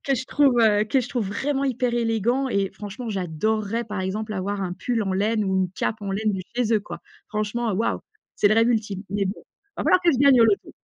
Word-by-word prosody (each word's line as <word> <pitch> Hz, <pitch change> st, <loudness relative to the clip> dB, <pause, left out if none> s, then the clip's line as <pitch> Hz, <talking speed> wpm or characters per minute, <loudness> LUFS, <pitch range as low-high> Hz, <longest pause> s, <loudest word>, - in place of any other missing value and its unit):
que 275 Hz, -, +2 dB
je 255 Hz, -, -3 dB
trouve, 280 Hz, -1 st, +3 dB
heu, 210 Hz, -2 st, +4 dB
que 260 Hz, +5 st, +1 dB
je 250 Hz, -, -5 dB
trouve 240 Hz, -6 st, -2 dB
vraiment 275 Hz, +7 st, -1 dB
hyper 250 Hz, -2 st, 0 dB
élégant 235 Hz, +3 st, +1 dB
et 200 Hz, -5 st, 0 dB
franchement 215 Hz, +3 st, -7 dB
j'adorerais, 210 Hz, +5 st, -1 dB
par 210 Hz, -3 st, -4 dB
exemple, 210 Hz, +3 st, -3 dB
avoir 195 Hz, +1 st, -2 dB
un 180 Hz, -2 st, -3 dB
pull 225 Hz, +5 st, -2 dB
en 195 Hz, -2 st, -2 dB
laine 210 Hz, +3 st, +1 dB
ou 190 Hz, -1 st, 0 dB
une 185 Hz, -2 st, +1 dB
cape 215 Hz, +3 st, -2 dB
en 200 Hz, -1 st, -4 dB
laine 210 Hz, +1 st, 0 dB
du 190 Hz, -1 st, -3 dB
chez 240 Hz, -2 st, +1 dB
eux 215 Hz, -, +3 dB
quoi. 170 Hz, -4 st, -9 dB, 0.3 s
Franchement 215 Hz, +2 st, -2 dB
waouh! 210 Hz, +4 st, 0 dB, 0.4 s
C'est -, -, +3 dB
le 215 Hz, -, +3 dB
rêve 230 Hz, +1 st, +4 dB
ultime. 210 Hz, -4 st, -1 dB
Mais 200 Hz, 0 st, 0 dB
bon, 195 Hz, +2 st, -4 dB
il 405 Hz, 0 st, -41 dB
va -, -, -1 dB
falloir 365 Hz, -, +4 dB
que 345 Hz, -1 st, +4 dB
je 260 Hz, -, 0 dB
gagne 275 Hz, -2 st, +6 dB
au -, -, +8 dB
loto! 210 Hz, -3 st, +1 dB
215 Hz, 250 wpm, -24 LUFS, 200-240 Hz, 0.4 s, au